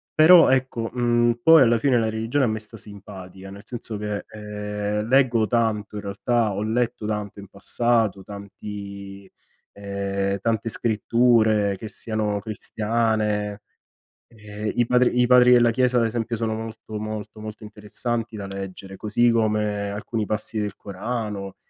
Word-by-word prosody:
Però 165 Hz, +2 st, +8 dB
ecco, 130 Hz, -3 st, 0 dB
mhmm, 120 Hz, -1 st, +1 dB
poi 160 Hz, -1 st, +8 dB
alla 120 Hz, -2 st, +5 dB
fine 125 Hz, +1 st, +2 dB
la 110 Hz, -1 st, 0 dB
religione 115 Hz, +5 st, 0 dB
a -, -, +1 dB
me 110 Hz, 0 st, -1 dB
sta 110 Hz, +1 st, -10 dB
simpatica, 95 Hz, -2 st, -10 dB
nel 100 Hz, +1 st, -11 dB
senso 115 Hz, -3 st, -6 dB
che, 105 Hz, -1 st, -3 dB
ehm, 105 Hz, 0 st, -4 dB
leggo 125 Hz, -3 st, +3 dB
tanto 110 Hz, -3 st, -1 dB
in -, -, -4 dB
realtà, 105 Hz, +2 st, 0 dB
ho 100 Hz, +2 st, -2 dB
letto 115 Hz, 0 st, -1 dB
tanto 105 Hz, -1 st, -4 dB
in 100 Hz, -, -12 dB
passato, 110 Hz, -1 st, 0 dB
tanti 100 Hz, -1 st, -9 dB, 0.4 s
ehm, 100 Hz, 0 st, -2 dB
tante 115 Hz, +2 st, -1 dB
scritture 110 Hz, -2 st, +2 dB
che 110 Hz, -, -7 dB
siano 105 Hz, -2 st, -2 dB
cristiane, 105 Hz, -1 st, -1 dB, 0.7 s
ehm 105 Hz, -1 st, -6 dB
i 120 Hz, -, +3 dB
padri 125 Hz, 0 st, +3 dB
i 125 Hz, -, +4 dB
padri 125 Hz, 0 st, +6 dB
della 120 Hz, -1 st, +5 dB
chiesa 125 Hz, +1 st, +2 dB
ad 115 Hz, -, +2 dB
esempio 115 Hz, 0 st, -2 dB
sono 110 Hz, 0 st, -2 dB
molto, 110 Hz, -1 st, -7 dB
molto, 110 Hz, 0 st, -6 dB
molto 110 Hz, 0 st, -8 dB
interessanti 110 Hz, +2 st, -4 dB
da 100 Hz, -2 st, -6 dB
leggere, 95 Hz, 0 st, -7 dB
così 115 Hz, +4 st, +1 dB
come 105 Hz, -3 st, 0 dB
alcuni 105 Hz, +2 st, -3 dB
passi 110 Hz, +1 st, -3 dB
del 105 Hz, -1 st, -3 dB
Corano, 100 Hz, -1 st, -5 dB
110 Hz, 150 wpm, -23 LUFS, 105-115 Hz, 0.7 s, Però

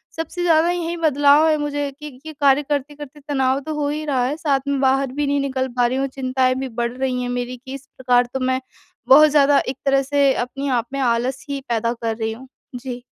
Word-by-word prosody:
सबसे 340 Hz, +2 st, -4 dB
ज़्यादा 330 Hz, 0 st, +3 dB
यही 345 Hz, -1 st, -3 dB
बदलाव 295 Hz, -1 st, +4 dB
है 310 Hz, -1 st, +3 dB
मुझे 290 Hz, -1 st, -2 dB
कि 300 Hz, +1 st, -10 dB
कि 265 Hz, +5 st, -12 dB
ये -, -, -8 dB
कार्य 280 Hz, +1 st, +4 dB
करते-करते 290 Hz, 0 st, -4 dB
तनाव 265 Hz, -1 st, +1 dB
तो 310 Hz, +3 st, -6 dB
हो 295 Hz, -1 st, -1 dB
ही 305 Hz, +1 st, -3 dB
रहा 265 Hz, -4 st, 0 dB
है। 275 Hz, +4 st, -1 dB
साथ 285 Hz, -4 st, +1 dB
में 280 Hz, -1 st, 0 dB
बाहर 265 Hz, 0 st, +2 dB
भी 290 Hz, +1 st, -2 dB
नहीं 285 Hz, 0 st, +1 dB
निकल 265 Hz, -1 st, -2 dB
पा 245 Hz, -, +4 dB
रही 250 Hz, +2 st, 0 dB
हूँ 270 Hz, 0 st, 0 dB
चिंताएँ 255 Hz, -1 st, 0 dB
भी 265 Hz, 0 st, -3 dB
बढ़ 235 Hz, -, -1 dB
रही 260 Hz, -1 st, -1 dB
हैं 245 Hz, -, -3 dB
मेरी 245 Hz, 0 st, -4 dB
कि 265 Hz, -, -7 dB
इस 275 Hz, 0 st, -9 dB
प्रकार 250 Hz, -1 st, +3 dB
तो 265 Hz, -, -2 dB
मैं 260 Hz, 0 st, 0 dB, 0.5 s
बहुत 300 Hz, +3 st, +8 dB
ज़्यादा 285 Hz, -1 st, +4 dB
एक 260 Hz, -, -3 dB
तरह 275 Hz, 0 st, +3 dB
से 280 Hz, 0 st, +2 dB
अपने 270 Hz, +3 st, -4 dB
आप 230 Hz, -, -5 dB
में 275 Hz, -, -2 dB
आलस 250 Hz, +1 st, -1 dB
ही 280 Hz, -1 st, -3 dB
पैदा 230 Hz, 0 st, 0 dB
कर 230 Hz, -1 st, -3 dB
रही 220 Hz, -1 st, -2 dB
हूँ। 255 Hz, +4 st, -12 dB, 0.3 s
जी। 245 Hz, 0 st, -6 dB
270 Hz, 235 wpm, -20 LUFS, 255-290 Hz, 0.5 s, बहुत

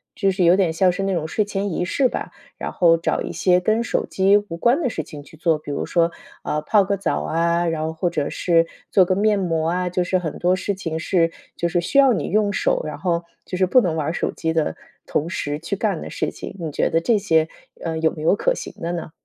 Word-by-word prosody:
就 195 Hz, -2 st, +2 dB
是 185 Hz, -1 st, +1 dB
有 175 Hz, +2 st, +6 dB
点 185 Hz, -4 st, +2 dB
像 180 Hz, +3 st, +3 dB
是 180 Hz, +2 st, -1 dB
那 195 Hz, 0 st, 0 dB
种 160 Hz, -3 st, -1 dB
睡 210 Hz, +6 st, 0 dB
前 200 Hz, -2 st, -3 dB
仪 -, -, -1 dB
式 255 Hz, +9 st, +2 dB
吧。 -, -, -5 dB, 0.3 s
然 -, -, -4 dB
后 170 Hz, -2 st, +4 dB
找 165 Hz, -, -1 dB
一 -, -, -4 dB
些 180 Hz, -1 st, +3 dB
跟 215 Hz, +5 st, +1 dB
手 -, -, -1 dB
机 195 Hz, +2 st, +3 dB
无 205 Hz, -5 st, -4 dB
关 245 Hz, -, +2 dB
的 255 Hz, -, +1 dB
事 160 Hz, -, -4 dB
情 145 Hz, 0 st, -10 dB
去 145 Hz, -, -16 dB
做， 160 Hz, -1 st, +1 dB
比 150 Hz, -, -7 dB
如 140 Hz, -, -2 dB
说， 170 Hz, -1 st, +2 dB, 0.4 s
嗯， 150 Hz, 0 st, -1 dB
泡 205 Hz, +1 st, +4 dB
个 200 Hz, -, 0 dB
澡 195 Hz, -, -1 dB
啊， 170 Hz, +1 st, +1 dB
然 160 Hz, -1 st, -1 dB
后 160 Hz, -, -2 dB
或 160 Hz, +2 st, -1 dB
者 145 Hz, -3 st, -2 dB
是 165 Hz, -2 st, +2 dB, 0.3 s
做 190 Hz, -, +6 dB
个 185 Hz, +1 st, +1 dB
面 210 Hz, 0 st, +3 dB
膜 165 Hz, -3 st, 0 dB
啊， 180 Hz, +1 st, -1 dB
就 180 Hz, 0 st, 0 dB
是 185 Hz, -, +1 dB
很 165 Hz, -4 st, -4 dB
多 180 Hz, +1 st, +3 dB
事 200 Hz, +2 st, -2 dB
情 165 Hz, -4 st, -4 dB
是 165 Hz, -2 st, +1 dB, 0.2 s
就 170 Hz, -, 0 dB
是 175 Hz, 0 st, 0 dB
需 225 Hz, -, -1 dB
要 270 Hz, -3 st, +6 dB
你 175 Hz, -9 st, -2 dB
用 205 Hz, +1 st, +2 dB
手， -, -, +1 dB
然 -, -, -5 dB
后 170 Hz, -2 st, -1 dB, 0.2 s
就 180 Hz, -, -5 dB
是 185 Hz, -, +3 dB
不 250 Hz, +7 st, +5 dB
能 165 Hz, -5 st, -1 dB
玩 150 Hz, -2 st, -1 dB
儿 160 Hz, -, -1 dB
手 -, -, -1 dB
机 160 Hz, -1 st, -2 dB
的 155 Hz, -, 0 dB, 0.3 s
同 160 Hz, -, -1 dB
时 150 Hz, -4 st, -3 dB
去 170 Hz, +5 st, -3 dB
干 200 Hz, -4 st, -1 dB
的 -, -, -7 dB
事 -, -, -2 dB
情。 -, -, -8 dB
你 160 Hz, -, -3 dB
觉 -, -, 0 dB
得 165 Hz, -, +1 dB
这 225 Hz, +4 st, +3 dB
些， 160 Hz, -5 st, +2 dB, 0.3 s
呃， 165 Hz, -1 st, -2 dB
有 160 Hz, 0 st, +2 dB
没 155 Hz, -, -8 dB
有 165 Hz, +6 st, +3 dB
可 -, -, +1 dB
行 -, -, -7 dB
的 170 Hz, +1 st, -2 dB
呢？ 165 Hz, -2 st, -5 dB
175 Hz, 285 characters per minute, -22 LUFS, 165-195 Hz, 0.4 s, 有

